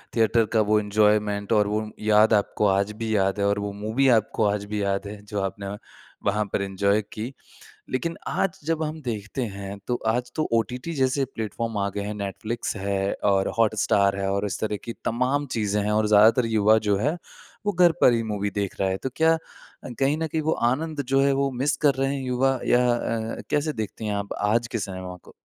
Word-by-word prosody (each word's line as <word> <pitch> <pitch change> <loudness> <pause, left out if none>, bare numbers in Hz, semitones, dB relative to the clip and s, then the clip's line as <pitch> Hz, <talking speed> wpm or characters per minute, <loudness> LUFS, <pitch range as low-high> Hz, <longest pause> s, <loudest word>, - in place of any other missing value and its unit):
Theatre 115 0 +3
का 110 - +4
वो 105 0 +5
enjoyment 105 0 +1
और 105 -1 +3
वो 105 +1 0 0.2
याद 110 +1 +4
आपको 105 0 +2
आज 100 +2 +1
भी 110 -1 0
याद 95 +1 +1
है 100 - +2
और 100 0 +1
वो 100 0 -3
मूवी 110 +7 0
आपको 110 0 -2
आज 100 0 0
भी 105 -1 -3
याद 100 +1 -1
है 105 0 -8
जो 105 -1 -3
आपने 100 +1 -4 0.5
वहाँ 105 +1 +2
पर - - +1
एन्जॉय 100 +2 +1
की। 115 +5 -5 0.6
लेकिन 165 +6 -2
आज 195 -3 -1
जब 160 -1 0
हम 155 +1 -3
देखते 110 +1 -4
हैं 100 0 -6
तो 125 - 0
आज 125 +2 0
तो 155 - 0
ओटीटी 125 - -1
जैसे 135 0 +1
प्लेटफ़ॉर्म 110 +1 -3
आ 100 0 0
गए 100 - -2
हैं 105 +1 -4
नेटफ्लिक्स 105 +3 -4
है 100 0 -1
और 95 -1 +3
हॉटस्टार 105 -3 +3
है 95 0 -1
और 100 +1 0
इस 100 - -3
तरह 105 -1 -1
की 115 - -4
तमाम 130 +5 0
चीज़ें 105 -1 0
हैं 105 +1 0
और 105 0 +2
ज़्यादातर 110 +3 +5
युवा 110 -1 +4
जो 100 - +3
है 150 +10 0 0.5
वो 205 - +2
घर 175 -2 +5
पर 125 - +6
ही 115 - +1
मूवी 105 -2 -2
देख 100 -1 -3
रहा 95 - +2
है। 95 - 0
तो 130 - -2
क्या 160 0 +4
अ, - - -2 0.6
कहीं 140 +2 +2
न 160 - -1
कहीं 155 0 -2
वो 160 +1 +1 0.2
आनंद 155 +1 -3
जो 135 - +5
है 140 0 +3
वो 140 - +1
मिस 145 - +1
कर 140 - +5
रहे 135 +1 0
हैं 135 - -4
युवा 130 +1 +1
या 125 - +4
अ, 115 -1 -3
कैसे 150 +1 +1
देखती 110 -2 -5
हैं 105 - -1
आप 100 0 -3
आज 115 +3 +2
के 115 - 0
सिनेमा 95 -2 -6
को? - - -15
110 Hz, 215 wpm, -25 LUFS, 100-125 Hz, 0.6 s, पर